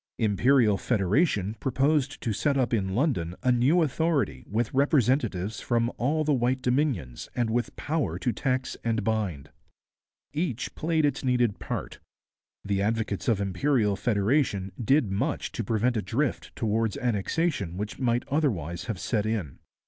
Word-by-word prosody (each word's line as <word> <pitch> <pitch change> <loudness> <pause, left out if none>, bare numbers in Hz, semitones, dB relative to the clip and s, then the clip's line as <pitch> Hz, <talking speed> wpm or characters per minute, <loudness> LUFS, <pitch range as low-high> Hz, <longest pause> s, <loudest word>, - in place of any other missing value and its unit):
Imperial 110 0 +3
Federation 105 - +1
proposed 140 +2 +1
to 115 - -1
set 140 +7 +1
up 125 -2 +1
in 95 -4 0
London 110 - 0
a 130 - +4
new 135 +8 +4
authority 160 0 0
with 110 +2 -1
representatives 125 - +1
from 120 0 +1
all 150 +6 +1
the 150 -1 +2
white 130 0 0
Dominions 125 - -1
and 120 -2 0
with 120 +1 -1
power 155 0 -1
to 125 - 0
tax 130 +2 -1
and 115 -2 0
bind. 95 -10 -2 0.8
Each 145 -6 -2
played 160 -1 +1
its 145 -1 -1
needed 125 -4 +1
part. - - -5 0.7
The 100 -1 0
advocates 110 -1 -1
of 110 -4 +2
Imperial 105 +2 +1
Federation 105 -2 +1
did 135 -2 +3
much 95 - -1
to - - -3
prevent 115 +4 +1
a 110 - +1
drift 120 +9 -2
towards 110 -1 0
Annexation 115 - -1
which 105 +3 -5
might 120 -2 0
otherwise 95 - -1
have 110 -7 -4
set 110 -1 -1
in. 105 -11 -3
120 Hz, 150 wpm, -27 LUFS, 100-135 Hz, 0.8 s, a